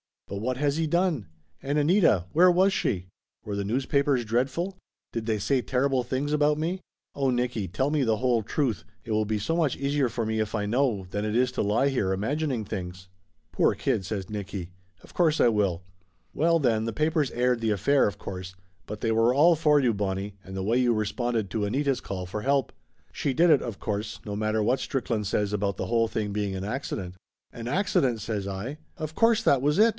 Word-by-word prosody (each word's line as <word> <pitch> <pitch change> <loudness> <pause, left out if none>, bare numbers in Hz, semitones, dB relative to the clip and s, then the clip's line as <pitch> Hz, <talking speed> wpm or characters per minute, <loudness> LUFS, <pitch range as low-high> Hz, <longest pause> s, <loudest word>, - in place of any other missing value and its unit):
But 100 - -5
what 125 +4 -2
has 145 +1 0
he 165 -1 0
done? 170 - +1 0.3
And 145 +2 -1
Anita 150 - +3
where 180 +4 +6
was 185 +2 +4
she? 90 - -1 0.3
Were 105 - -4
the 100 0 -2
news 125 +6 -1
papers 140 -3 +2
dreadful? 135 - -1 0.3
Did 115 -1 -4
they 110 -2 +1
say 130 +6 +1
terrible 130 +1 +1
things 130 +4 -2
about 150 0 +3
me? 170 +5 -2 0.3
Oh, 135 -1 0
Nicky, 120 -5 -1
tell 130 - -1
me 150 -3 +2
the 110 -3 +2
whole 125 -1 +2
truth 120 +1 -1 0.2
it 115 - -7
will 110 0 +2
be 110 +1 -1
so 165 +11 -1
much 155 -6 +1
easier 140 -1 0
for 115 -1 -3
me 110 0 -1
if 110 +1 -1
I 105 -1 -1
know, 115 -3 +1
than 105 +1 -2
it 105 +1 -2
is 125 +1 +2
to - - -2
lie 110 +7 +2
here 100 -8 0
imagining 130 +4 -1
things 90 -2 -6 0.2
!" 80 -1 -44
"Poor - - +2
kid!" 95 - -1
says 95 -1 -4
Nicky. 100 -4 -5 0.3
"Of - - -16
course 160 -3 +2
I 120 - +6
will. 100 -5 0 0.5
Well 165 +2 +3
then, 115 -6 +1
the 115 - -3
papers 155 +1 +1
aired 125 0 +1
the 115 -1 0
affair, 135 +7 +3
of 100 - -4
course, 90 -1 -7 0.3
but 105 0 -6
they 115 - +1
were 115 +2 +3
all 165 +4 +6
for 150 -2 +4
you, 120 -4 +2
Bonnie, 100 0 -3
and 95 +1 -8
the 95 - -3
way 115 +5 +2
you 125 -2 +3
responded 110 0 -1
to 105 -2 -1
Anita's 135 +5 0
call 95 -2 -5
for 100 +4 -5
help. 135 +1 +1 0.4
She 140 - -1
did 170 +5 +4
it, 150 -4 +5
of 115 -5 -6
course, 105 +1 -3
no 105 -1 -4
mat 110 0 -1
ter 110 -1 +1
what 125 +5 +2
Strickland 115 -6 -2
says 100 +1 0
about 100 -1 0
the - - -4
whole 115 -1 +2
thing 105 -2 -3
being 100 -1 -2
an 95 - -4
accident." 100 -5 -4 0.4
"An 115 0 -7
accident!" 135 - +1
says 100 -2 -3
I. 100 +10 -5 0.2
"Of 155 -2 -5
course 230 +3 +3
that 135 -3 +4
was 150 +2 +2
it! 220 +2 +6
120 Hz, 220 wpm, -27 LUFS, 105-140 Hz, 0.5 s, where